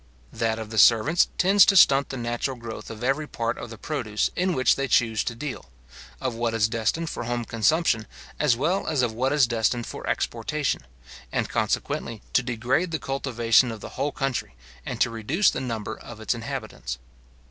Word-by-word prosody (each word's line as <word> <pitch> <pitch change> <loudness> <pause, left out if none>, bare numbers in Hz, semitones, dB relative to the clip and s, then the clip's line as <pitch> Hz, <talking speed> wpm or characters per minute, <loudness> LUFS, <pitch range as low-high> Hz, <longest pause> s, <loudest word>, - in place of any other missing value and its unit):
That 115 -1 0
of 110 -1 -7
the 110 - +1
servants 120 - +5
tends 195 +2 +6
to 200 - +4
stunt 140 -6 +6
the 135 - -5
natural 120 +2 -2
growth 115 -1 -8
of 110 +1 -8
every 135 +4 0
part 115 -3 -3
of 120 - -7
the 110 - -9
produce 110 -6 -2
in 180 -1 +1
which 130 - +4
they 135 0 -1
choose 115 -3 +2
to 115 - -3
deal; 135 - -6 0.5
of 130 - -2
what 115 0 -1
is 105 -2 +3
destined 115 +9 -1
for - - -5
home 120 0 -2
consumption, 115 0 +1 0.3
as 145 -6 +3
well 175 +9 0
as 140 -5 +1
of 115 -2 0
what 130 +4 0
is 145 -3 +5
destined 115 +1 0
for - - -7
exportation; 150 -2 -2 0.4
and - - -1
consequently 115 -2 -2
to - - +4
degrade 125 +8 0
the 160 - -1
cultivation 125 -4 +2
of 110 - -7
the - - -8
whole 140 +2 -2
country, 135 - -3 0.3
and - - -4
to 120 - +3
reduce 130 - +2
the - - -4
number 110 -4 -4
of 120 -2 -11
its 110 - 0
inhabitants. 115 - -5
120 Hz, 190 wpm, -25 LUFS, 115-140 Hz, 0.5 s, tends